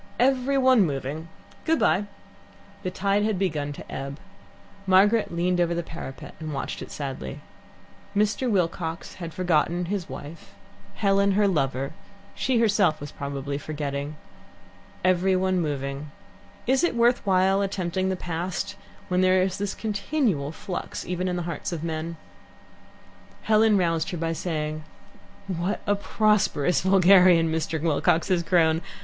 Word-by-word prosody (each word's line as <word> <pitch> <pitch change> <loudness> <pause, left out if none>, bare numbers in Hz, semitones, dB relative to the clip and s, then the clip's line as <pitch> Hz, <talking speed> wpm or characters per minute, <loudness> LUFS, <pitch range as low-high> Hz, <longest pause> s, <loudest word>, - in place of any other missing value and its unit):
"Every 265 +2 +3
one 260 -3 +5
moving! 145 +1 -3 0.4
Good 325 0 +2
bye." 205 -7 +2 0.8
The 185 - -2
tide 200 +2 +1
had 215 -2 0
begun 155 -6 -1
to - - -11
ebb. 140 +1 -5 0.7
Margaret 205 +4 +4
leant 175 +1 0
over 170 -1 +2
the 170 - -2
parapet 160 -5 -8
and 155 -2 -5
watched 135 - -4
it - - -7
sadly. 135 - -6 0.7
Mr. 210 +5 +1
Wilcox 170 -4 -1
had 165 -1 -5
forgotten 175 0 +1
his 185 -2 -3
wife, 145 +5 -9 0.4
Helen 200 -1 +3
her 205 +1 +3
lover; 135 -6 0 0.4
she 255 -1 0
herself 205 -8 +3
was 145 0 -7
probably 140 0 -4
forgetting. 145 -1 -4 0.9
Every 185 +1 +3
one 185 -1 +1
moving. 140 -1 -3 0.6
Is 265 +4 +2
it 345 - +1
worth 240 +1 +3
while 190 0 +3
attempting 190 -1 -1
the 190 - 0
past 175 +1 -3 0.3
when 180 0 +1
there 185 0 +4
is 190 0 -2
this 200 -1 -2
continual 210 - -1
flux 180 +3 -5
even 180 +1 -2
in 180 - -1
the 175 - -2
hearts 170 - -4
of 165 -2 -4
men? 165 0 -4 1.3
Helen 215 -1 +4
roused 165 -1 +1
her 180 - -4
by 165 0 -1
saying: 155 -2 -3 0.6
"What 185 +1 -2
a 205 - +3
prosperous 205 -6 +2
vulgarian 185 -3 +6
Mr. 160 0 -1
Wilcox 160 +1 +1
has 180 -2 +3
grown! 165 -2 +3
180 Hz, 145 wpm, -25 LUFS, 155-200 Hz, 1.3 s, vulgarian